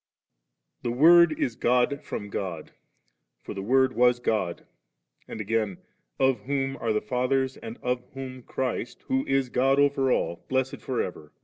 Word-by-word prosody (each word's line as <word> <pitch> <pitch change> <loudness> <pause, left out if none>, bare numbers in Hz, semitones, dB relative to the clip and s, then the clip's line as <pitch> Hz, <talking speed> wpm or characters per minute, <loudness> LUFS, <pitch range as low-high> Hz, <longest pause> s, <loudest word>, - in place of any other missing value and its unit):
I. - - -2
Thb 120 - -1
Word 170 +1 +7
is 120 - 0
God 125 +5 +1
from 105 -7 -6
God; 85 -5 -4 0.7
for - - -6
'the 95 - -5
Word 130 +5 +3
was 125 0 +4
God 105 -7 -1 0.6
'/and - - -7
again, 105 -3 -1 0.2
* - - -48
Of 130 -4 -1
whom 135 0 -1
are 115 - -1
the 105 - +1
Fathers, 130 +3 0
and 115 +1 -8
of 125 0 0
whom 130 -1 -7
Christ, 125 -1 -4
who 265 0 +2
is 135 -2 +1
God 135 +3 +2
over 140 -2 +3
all, 85 - -1
blessed 130 0 -1
for 130 -2 -1
ever. 75 -4 -8
125 Hz, 170 wpm, -26 LUFS, 110-135 Hz, 0.7 s, Word